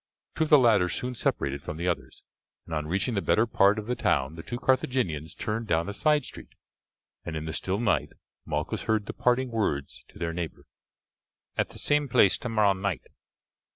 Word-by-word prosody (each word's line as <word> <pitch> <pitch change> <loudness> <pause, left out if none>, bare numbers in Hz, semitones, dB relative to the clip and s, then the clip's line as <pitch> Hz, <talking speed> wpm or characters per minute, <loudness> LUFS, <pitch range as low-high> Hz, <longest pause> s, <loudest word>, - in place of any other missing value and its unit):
Two 160 - +1
of - - -7
the 150 - +9
latter 110 -8 +4
soon 125 +6 -3
separated 70 - -1
from 75 - -6
the 85 +2 -2
others, 85 - -3 0.4
and 80 - -8
on 75 -1 -2
reaching 100 +8 0
the 100 - 0
better 110 - +3
part 100 -2 +4
of 105 - -4
the 125 - -1
town 70 - +1
the 85 - -7
two 105 +8 -5
Carthaginians 125 - 0
turned 110 +1 -3
down 85 -1 +1
a 100 - -4
side 150 +2 +2
street, - - -11 0.7
and 85 - -5
in 80 0 -4
the 80 - -4
still 95 +2 -1
night 115 -6 +1 0.3
Malchus - - -3
heard 110 -2 +1
the - - -5
parting 125 0 +1
words 75 -11 -2
to - - -17
their 85 -1 -2
neighbour, 85 -1 -5 0.9
"At - - 0
the - - -12
same 145 -1 +1
place 100 -5 +4
tomorrow 110 -5 +2
night." 95 -1 -3
100 Hz, 195 wpm, -27 LUFS, 85-120 Hz, 0.9 s, the